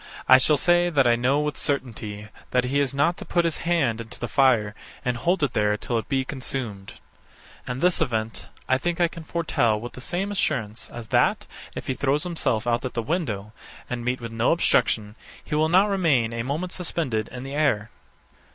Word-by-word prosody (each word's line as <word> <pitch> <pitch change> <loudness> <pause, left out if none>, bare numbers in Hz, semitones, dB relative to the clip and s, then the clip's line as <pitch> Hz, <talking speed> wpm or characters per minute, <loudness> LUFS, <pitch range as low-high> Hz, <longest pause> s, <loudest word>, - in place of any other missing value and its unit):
I 130 - +9
shall 150 +3 +4
say 175 +3 +3
that 140 -5 +3
I 120 -1 +5
know 130 +5 +2
with 150 0 -2
certainty 110 -6 -3 0.2
that 125 0 +2
he 135 +3 0
is 140 -2 +1
not 145 +5 +1
to - - -7
put 170 -1 +1
his 165 -3 0
hand 130 -10 +1
into 115 - -9
the 120 - -3
fire 120 -5 +3 0.3
and 125 -1 +1
hold 170 +8 0
it 140 - +1
there 105 0 +2
till 115 +2 -1
it - - -9
be 135 -1 +1
consumed: 125 -7 -4 0.7
And 125 +2 -4
this 180 -1 +3
event, 110 -7 -2 0.2
I 130 0 +2
think 175 +4 -2
I 175 - +4
can 165 0 -10
foretell 135 -10 0
with 120 +2 -7
the 130 - -10
same 185 +8 -2
assurance, 115 - -2
as 115 -2 -9
that, - - +2 0.3
if - - -5
he 130 - -1
throw 140 +2 +1
himself 150 -10 -1
out 120 0 +1
at 130 - -5
the 115 - -1
window, 110 - -2 0.4
and 120 -1 -3
meet 125 +1 -1
with 115 -1 -6
no 115 +1 +2
obstruction, 110 -10 +2 0.3
he - - -7
will 155 +1 +2
not 185 +4 +5
remain 155 - +2
a 115 - -2
moment 155 +9 -3
suspended 135 - -1
in 125 0 -8
the 135 +1 -7
air. 110 -8 +1
130 Hz, 205 wpm, -24 LUFS, 115-160 Hz, 0.7 s, I